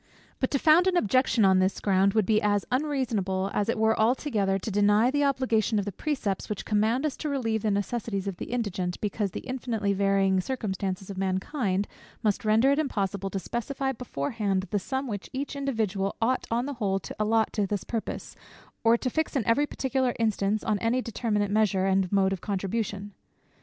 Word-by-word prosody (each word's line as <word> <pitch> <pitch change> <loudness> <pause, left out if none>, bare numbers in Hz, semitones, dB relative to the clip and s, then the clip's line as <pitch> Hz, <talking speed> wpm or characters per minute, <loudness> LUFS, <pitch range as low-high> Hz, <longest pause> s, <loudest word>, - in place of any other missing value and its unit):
But, 260 - +1
to 280 - +1
found 320 +6 +5
an 365 -1 +3
objection 255 - +3
on 190 -1 +5
this 185 +1 +1
ground, 195 0 +2
would 215 -3 +3
be 215 +2 +3
as 205 -1 +1
unreasonable 230 -9 0
as 205 +1 0
it 230 - +1
were 220 0 +3
altogether 220 -4 +1
to 205 +3 -5
deny 205 +4 +4
the 290 +1 +1
obligation 245 -6 +1
of 200 - 0
the 205 - -3
precepts, 220 - -2
which 210 - -4
command 220 +6 +1
us 295 - -1
to 305 - -3
relieve 225 -6 -1
the 215 - 0
necessities 200 0 -2
of 195 -3 -3
the - - -5
indigent, 190 -7 -2
because 205 -1 -1
the - - -6
infinitely 235 -6 -2
varying 195 -1 +2
circumstances 195 -4 -3
of 190 - -6
mankind 195 +1 -1 0.4
must 210 -3 +1
render 225 +5 +4
it 280 - +2
impossible 200 -9 -1
to 195 - -3
specify 265 +7 -2
beforehand 200 - -2
the 205 - +1
sum 265 +7 -3
which 205 -6 -5
each 280 +2 -4
individual 220 -8 -1
ought 250 +3 0
on 235 +2 0
the 285 - -3
whole 195 -2 +1
to 175 - -8
allot 220 +1 +2
to 205 -3 0
this 205 -1 -2
purpose, 230 -2 -5 0.5
or 230 +1 +5
to 255 - -3
fix 315 +5 -1
in 250 -6 +1
every 260 +7 +3
particular 260 -3 -1
instance, 215 -2 0
on 210 -2 0
any 230 +4 +1
determinate 210 -3 -1
measure, 205 -3 +2
and 190 -1 +1
mode 195 -1 +3
of 185 - -5
contribution. 200 0 -3
215 Hz, 195 wpm, -27 LUFS, 195-250 Hz, 0.5 s, found